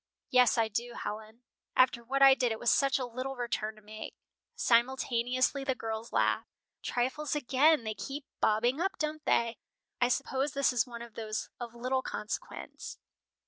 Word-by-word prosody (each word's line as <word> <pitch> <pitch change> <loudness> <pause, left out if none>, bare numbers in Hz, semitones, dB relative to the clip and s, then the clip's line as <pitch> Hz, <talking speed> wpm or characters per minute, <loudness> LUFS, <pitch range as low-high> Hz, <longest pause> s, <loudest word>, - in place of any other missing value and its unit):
"Yes, 250 -1 +5
I 225 -1 +3
do, 235 +3 -3
Helen." 220 +3 -6 0.3
"After 255 -2 +4
what 275 +3 +2
I 270 0 +10
did 250 -3 +1
it 220 - -2
was 240 - +2
such 275 -1 +3
a 260 - -2
little 255 +3 -5
return 225 -3 -2
to 215 - -18
make." 215 +1 -8 0.4
Simultaneously 255 - +2
the 265 -1 0
girls 225 -1 -5
laughed. - - +1 0.3
"Trifles 260 +5 -1
again! 290 +1 +3
They 220 -1 -2
keep 275 +6 -6
bobbing 240 +7 +2
up, 390 +4 -1
don't 305 0 -3
they? 235 0 +1 0.4
I 245 - +5
suppose 265 +3 0
this 280 -2 +2
is 245 0 +2
one 235 -1 -7
of 235 -2 -12
those 215 -1 -4
of 240 -1 -7
little 255 +2 0
consequence." 260 - -6
245 Hz, 170 wpm, -31 LUFS, 230-270 Hz, 0.4 s, I